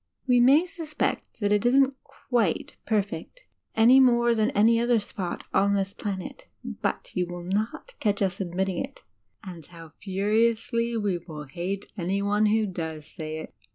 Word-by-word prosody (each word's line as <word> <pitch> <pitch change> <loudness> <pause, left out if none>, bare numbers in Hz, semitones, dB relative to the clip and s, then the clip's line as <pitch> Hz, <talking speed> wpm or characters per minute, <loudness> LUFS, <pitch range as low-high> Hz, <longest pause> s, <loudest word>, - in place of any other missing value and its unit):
We 250 -2 +4
may 275 +8 +6
suspect 320 -8 -4
that 205 0 +1
it 210 -1 +3
isn't 265 +2 +4 0.4
quitt 225 -9 +1
perfect, 215 - -2 0.3
any 235 +4 +7
more 240 -2 +4
than 220 0 +2
any 230 +2 +5
other 240 0 +3
spot 190 -4 -4
on 200 +1 +3
this 195 0 -1
planet, 190 -3 -6 0.2
but 70 0 -4
you 180 -1 0
will 175 0 -7
not 215 - -3
catch 205 -2 +1
us 190 -1 -1
admining 185 0 -1
it. - - -11 0.4
And 180 -4 -9
how 165 0 -13
furiously 225 +4 +1
we 200 -5 0 0.3
hate 185 +4 -3
any 195 +1 -1
one 205 +1 +2
who 215 +1 +2
does 160 -5 -5
say 155 0 -6
it! - - -11
205 Hz, 155 wpm, -26 LUFS, 180-235 Hz, 0.4 s, any